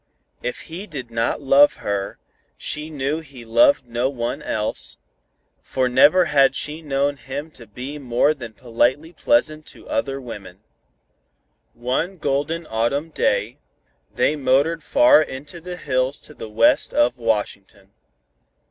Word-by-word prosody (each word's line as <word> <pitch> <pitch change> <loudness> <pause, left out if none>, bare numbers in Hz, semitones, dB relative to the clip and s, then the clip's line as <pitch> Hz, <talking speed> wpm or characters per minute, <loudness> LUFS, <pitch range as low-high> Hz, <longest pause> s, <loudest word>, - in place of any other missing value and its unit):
If 125 - -4
he 180 +6 -8
did 130 - -7
not 115 +5 -1
love 140 +2 +6
her, 100 -1 -3 0.4
she 150 +1 -4
knew 145 +1 -2
he 135 -6 -12
loved 285 - +4
no 120 +2 0
one 120 -3 -3
else, 105 0 -4 0.6
for 130 -1 -1
never 145 +8 +5
had 135 -4 +4
she 150 +2 -3
known 140 -1 0
him 145 +4 -7
to 115 -6 -13
be 130 +7 -7
more 130 +3 +2
than 120 -6 -9
politely 125 - 0
pleasant 155 - +1
to - - -13
other 135 0 -2
women. 105 -7 -10 1.1
One 130 +10 -2
golden 150 +3 -1
autumn 120 +8 -1
day, - - 0 0.5
they 155 - +1
motored 145 +4 +2
far 295 - +6
into 145 +6 -7
the 180 +1 -7
hills 130 -2 -1
to - - -11
the 110 - -9
west 110 +2 +3
of 120 +2 +2
Washington. 100 -3 -3
135 Hz, 140 wpm, -22 LUFS, 120-155 Hz, 1.1 s, love